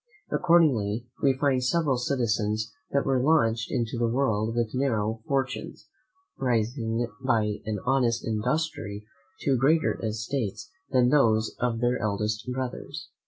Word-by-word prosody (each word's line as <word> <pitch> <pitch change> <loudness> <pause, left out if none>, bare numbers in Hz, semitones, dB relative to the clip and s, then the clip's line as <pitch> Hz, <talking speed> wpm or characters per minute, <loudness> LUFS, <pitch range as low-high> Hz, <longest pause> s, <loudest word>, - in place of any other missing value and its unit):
Accordingly, 125 - +3 0.2
we 135 -2 +3
find 135 -3 +2
several 150 0 +2
citizens 115 -4 -1 0.2
that 140 - +1
were 135 -2 +2
launched 115 -6 +2
into 120 0 -1
the 120 - +2
world 115 -3 0
with 120 -2 -1
narrow 110 -4 0
fortunes, 135 -1 -3 0.5
rising 120 -1 0 0.2
by 110 -5 +1
an 110 -1 -1
honest 125 -3 +1
industry 110 -2 -2 0.4
to 135 - +2
greater 150 +4 +2
estates 110 0 -3 0.2
than 125 -1 +3
those 110 -6 +3
of 120 -2 -1
their 120 +1 +1
elder 105 -1 0 0.3
brothers. 130 -1 -5
120 Hz, 125 wpm, -27 LUFS, 110-135 Hz, 0.5 s, Accordingly